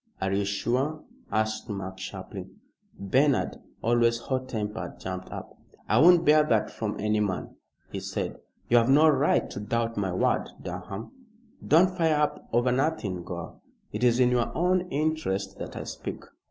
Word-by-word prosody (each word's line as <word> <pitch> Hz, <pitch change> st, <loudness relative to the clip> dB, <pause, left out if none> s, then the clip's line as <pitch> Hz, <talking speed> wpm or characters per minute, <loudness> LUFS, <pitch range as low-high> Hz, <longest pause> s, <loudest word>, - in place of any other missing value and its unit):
"Are 95 Hz, 0 st, -1 dB
you 100 Hz, +1 st, +1 dB
sure?" 125 Hz, +9 st, -1 dB, 0.3 s
asked 110 Hz, 0 st, -1 dB
Mark, 95 Hz, -2 st, -5 dB
sharply. 95 Hz, -, -7 dB, 0.5 s
Bernard, 130 Hz, +8 st, +2 dB, 0.3 s
always 115 Hz, 0 st, +3 dB
hot 130 Hz, +2 st, -3 dB
tempered, 105 Hz, -3 st, -4 dB
jumped 95 Hz, 0 st, -5 dB
up. -, -, -7 dB, 0.4 s
"I -, -, +3 dB
won't 175 Hz, +1 st, +7 dB
bear 150 Hz, +1 st, +6 dB
that 115 Hz, -8 st, +1 dB
from 105 Hz, -2 st, -4 dB
any 105 Hz, +1 st, +1 dB
man," 100 Hz, -3 st, -2 dB, 0.4 s
he -, -, -3 dB
said. -, -, -4 dB, 0.3 s
"You 120 Hz, -, +5 dB
have 115 Hz, +1 st, +4 dB
no 150 Hz, +4 st, +7 dB
right 145 Hz, -1 st, +3 dB
to -, -, -5 dB
doubt 115 Hz, +2 st, -1 dB
my 95 Hz, -2 st, 0 dB
word, 90 Hz, -, +1 dB
Durham." 95 Hz, +4 st, -6 dB, 0.5 s
"Don't 180 Hz, +4 st, +4 dB
fire 165 Hz, -3 st, +3 dB
up 150 Hz, 0 st, -1 dB
over 120 Hz, +2 st, +3 dB
nothing, 125 Hz, -, 0 dB
Gore. 85 Hz, -1 st, -7 dB, 0.3 s
It 105 Hz, +3 st, -3 dB
is 120 Hz, 0 st, +4 dB
in 125 Hz, -1 st, +5 dB
your 120 Hz, -1 st, +1 dB
own 180 Hz, +1 st, +2 dB
interest 140 Hz, -11 st, -1 dB
that -, -, -6 dB
I -, -, -4 dB
speak. -, -, -6 dB
115 Hz, 165 wpm, -27 LUFS, 100-150 Hz, 0.5 s, won't